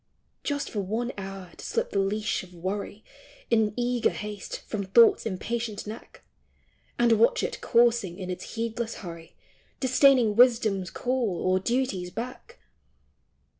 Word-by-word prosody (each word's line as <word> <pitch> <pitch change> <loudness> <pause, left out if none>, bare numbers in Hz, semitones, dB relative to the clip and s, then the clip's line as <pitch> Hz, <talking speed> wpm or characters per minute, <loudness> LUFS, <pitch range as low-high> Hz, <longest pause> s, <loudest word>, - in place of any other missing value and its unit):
Just 285 -1 -2
for 210 - -3
one 220 +6 -2
hour 195 -2 -7
to - - -12
slip - - -2
the 200 - +1
leash 210 +3 0
of 180 -1 -14
Worry, 200 +4 -4 0.5
In 220 -2 +3
eager 245 -1 +1
haste, 210 -1 -6
from 210 -2 -4
Thought's 225 +4 +5
impatient 220 +2 -3
neck, 215 +2 -10 0.7
And 235 -2 +4
watch 485 - +4
it 485 +2 -3
coursing, 230 -7 +3
in 185 -2 -5
its 180 - -7
heedless 230 0 -3
hurry 165 -1 -9 0.4
Disdaining 255 -4 +4
Wisdom's 225 -6 +4
call 240 -5 -1
or 185 0 +3
Duty's 235 -4 -1
beck 250 - -7
220 Hz, 135 wpm, -27 LUFS, 195-240 Hz, 0.7 s, Thought's